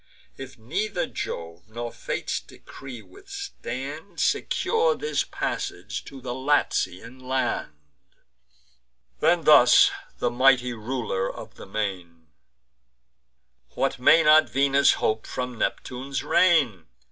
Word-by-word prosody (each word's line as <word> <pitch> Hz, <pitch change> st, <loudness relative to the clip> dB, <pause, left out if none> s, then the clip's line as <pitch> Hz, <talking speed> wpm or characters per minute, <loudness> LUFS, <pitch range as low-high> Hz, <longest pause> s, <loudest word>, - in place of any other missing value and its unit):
If 135 Hz, -1 st, -10 dB
neither 175 Hz, -, -2 dB
Jove's 85 Hz, +1 st, -6 dB
nor 120 Hz, +1 st, -5 dB
Fate's -, -, -3 dB
decree 130 Hz, -4 st, -12 dB
withstand, 200 Hz, -, -8 dB
Secure 465 Hz, +1 st, +1 dB
his 450 Hz, -, -1 dB
passage -, -, -4 dB
to 135 Hz, -, -10 dB
the 125 Hz, -1 st, -5 dB
Latian 130 Hz, -4 st, -1 dB
land." 130 Hz, -, -2 dB, 1.5 s
Then -, -, +3 dB
thus -, -, +7 dB, 0.3 s
the 120 Hz, -, 0 dB
mighty 125 Hz, 0 st, +3 dB
Ruler 110 Hz, -4 st, -3 dB
of -, -, -11 dB
the -, -, -12 dB
Main: 90 Hz, -6 st, -5 dB, 1.5 s
"What 135 Hz, -1 st, -1 dB
may 160 Hz, +6 st, +6 dB
not 155 Hz, 0 st, +6 dB
Venus 140 Hz, +1 st, +4 dB
hope 110 Hz, 0 st, -1 dB
from 125 Hz, -2 st, -5 dB
Neptune's 130 Hz, +2 st, -3 dB
reign? 140 Hz, -, +3 dB
130 Hz, 105 wpm, -25 LUFS, 110-145 Hz, 1.5 s, thus